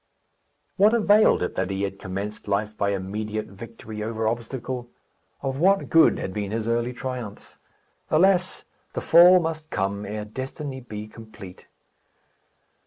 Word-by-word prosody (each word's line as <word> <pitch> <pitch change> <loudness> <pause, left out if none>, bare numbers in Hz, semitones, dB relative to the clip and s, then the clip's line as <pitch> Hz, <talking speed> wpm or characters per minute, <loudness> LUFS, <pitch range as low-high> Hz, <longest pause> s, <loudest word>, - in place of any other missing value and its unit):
What 210 +4 +5
availed 210 - +4
it - - -2
that 95 0 -2
he 100 0 -2
had 100 0 -4
commenced 100 +3 -6
life 105 +1 -1
by 100 - 0
immediate 105 +2 -3
victory 110 +1 -9
over 110 0 -2
obstacle? 120 +2 -4 0.5
Of 135 0 -2
what 195 +4 +3
good 165 - +6
had 95 - -4
been 105 -1 -3
his 110 +1 -3
early 120 +1 0
triumphs? 125 -4 -7 0.5
Alas! 185 +3 +2 0.3
the - - -3
fall 175 +2 +7
must 160 -2 -4
come, 100 -1 -2
ere 105 +1 -4
destiny 130 +4 -6
be 105 -4 -8
complete. 110 -4 -12
110 Hz, 140 wpm, -24 LUFS, 105-135 Hz, 0.5 s, fall